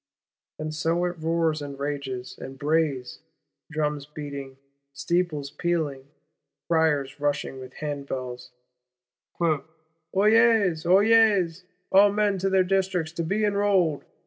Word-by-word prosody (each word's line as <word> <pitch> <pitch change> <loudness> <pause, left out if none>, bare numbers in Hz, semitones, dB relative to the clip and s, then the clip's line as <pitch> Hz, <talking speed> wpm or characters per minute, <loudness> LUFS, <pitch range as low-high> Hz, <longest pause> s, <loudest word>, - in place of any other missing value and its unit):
And 155 0 -4
so 165 +3 0
it 175 -1 -4
roars, 160 -1 0
and 140 -1 -7
rages, 140 -3 -4
and 135 +1 -8
brays; 145 -4 0 0.5
drums 150 -2 -2
beating, 140 -3 -7 0.4
steeples 155 -2 -1
pealing; 155 -6 -2 0.6
criers 150 -4 +1
rushing 145 -2 -2
with 130 0 -10
hand 145 -2 -5
bells: 125 -1 -5 0.9
'Oyez, 170 - +1
oyez. 195 -3 +4 0.3
All 200 +1 +6
men 205 -1 +1
to 195 +2 0
their 190 -1 +4
Districts 185 -3 0
to 170 0 -3
be 205 +6 0
enrolled! 200 -7 +2
160 Hz, 115 wpm, -25 LUFS, 145-185 Hz, 0.9 s, All